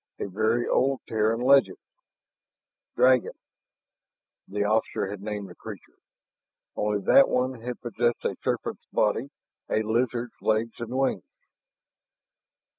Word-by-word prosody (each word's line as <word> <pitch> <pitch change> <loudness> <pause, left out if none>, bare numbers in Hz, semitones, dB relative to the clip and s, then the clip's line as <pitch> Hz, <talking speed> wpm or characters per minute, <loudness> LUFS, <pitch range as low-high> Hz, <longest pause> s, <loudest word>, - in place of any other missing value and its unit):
A - - -3
very 110 +5 0
old 135 0 +1
Terran 110 +1 +1
legend 135 +1 +4 1.2
"Dragon," 130 -1 +4 1.1
the 100 +1 -1
officer 105 -2 0
had 105 -2 -7
named 105 -1 -4
the 90 - -11
creature. - - -11 0.8
Only 105 -1 0
that 275 - +6
one 125 -1 -1
had 125 +1 -5
possessed 120 0 -1
a - - 0
serpent's - - -3
body, - - +1 0.4
a 110 - +1
lizard's 120 +2 -1
legs 110 +2 0
and 120 -1 -5
wings. 135 0 0
115 Hz, 115 wpm, -26 LUFS, 105-125 Hz, 1.2 s, that